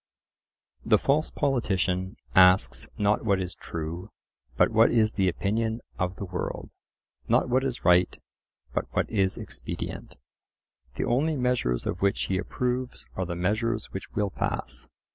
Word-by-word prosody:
The - - +5
false 150 +3 +1
politician 95 -7 0 0.2
asks 95 -1 +5
not 105 0 +2
what 100 -4 +2
is 90 -1 -3
true, 85 +4 -6 0.5
but - - +4
what 115 +1 +5
is 110 -2 +3
the 95 -3 +2
opinion 110 +6 -1 0.2
of 90 +1 -1
the 100 - -5
world—not 90 +6 -3
what 130 +2 +2
is 130 -3 -3
right, 90 0 +4 0.5
but - - 0
what - - +2
is 95 -3 +1
expedient. - - -6 0.8
The - - -1
only 150 +6 +1
measures 125 - 0
of 90 - -3
which 100 0 +2
he 95 -1 0
approves 125 +3 -2
are 95 -2 -2
the 85 - -3
measures 110 +5 -1
which 95 - -6
will 105 -2 0
pass. - - -4
100 Hz, 145 wpm, -27 LUFS, 90-120 Hz, 0.8 s, The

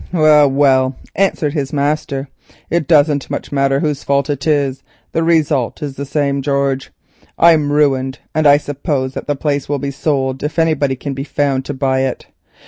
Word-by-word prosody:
"Well, 155 -4 +5
well," 135 -1 +2 0.2
answered 165 -7 0
his 140 -4 -2
master, 145 -1 -1 0.4
"it 170 -3 0
doesn't 145 -3 +3
much - - -5
matter 135 0 +1
whose 150 -3 -2
fault 140 +1 0
it 140 +1 -4
is, 140 -3 +1 0.3
the 165 - 0
result 155 -6 +1
is 140 -2 -5
the 140 +1 -6
same, 140 -1 0
George; 140 -1 -1 0.5
I'm 160 -4 +4
ruined, 135 -3 +1 0.2
and 155 -1 +2
I 145 0 +7
suppose 140 -2 -3
that - - -6
the 145 - 0
place 140 -1 -2
will 145 - 0
be 140 0 -4
sold 135 -2 -1
if 150 +3 -4
anybody 155 -5 +1
can 140 +2 -5
be 135 0 -4
found 140 -2 -1
to 145 - -5
buy 130 -1 0
it. 130 -1 -2
140 Hz, 180 wpm, -16 LUFS, 135-150 Hz, 0.5 s, I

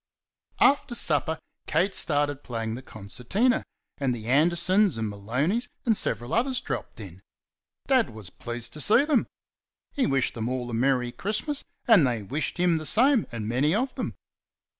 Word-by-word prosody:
After 275 -3 +3
supper, 160 - +2 0.3
Kate 180 +6 +1
started 145 -2 +1
playing 115 -3 -4
the 125 - -6
concertina, 125 - -1 0.4
and 130 -3 0
the 110 -2 -8
Andersons 175 - +3
and 110 -1 -2
Maloneys 130 - -1 0.2
and 225 -3 +3
several 120 -6 -1
others 255 +2 +1
dropped - - -6
in. - - -10 0.6
Dad 260 -4 +3
was 105 -5 -10
pleased 120 +2 -5
to 150 - -3
see 235 - +5
them; 295 -6 +2 0.6
he 275 - 0
wished 135 -2 +1
them 115 0 -3
all 125 -1 -3
a - - -6
merry 125 0 +1
Christmas, 215 - -2 0.2
and 200 - +6
they 115 -4 -2
wished 140 - -2
him 175 -2 +2
the 155 - -7
same 250 - +4
and 110 -3 -5
many 135 - +1
of 255 +4 -1
them. - - -4
145 Hz, 160 wpm, -26 LUFS, -, 0.6 s, and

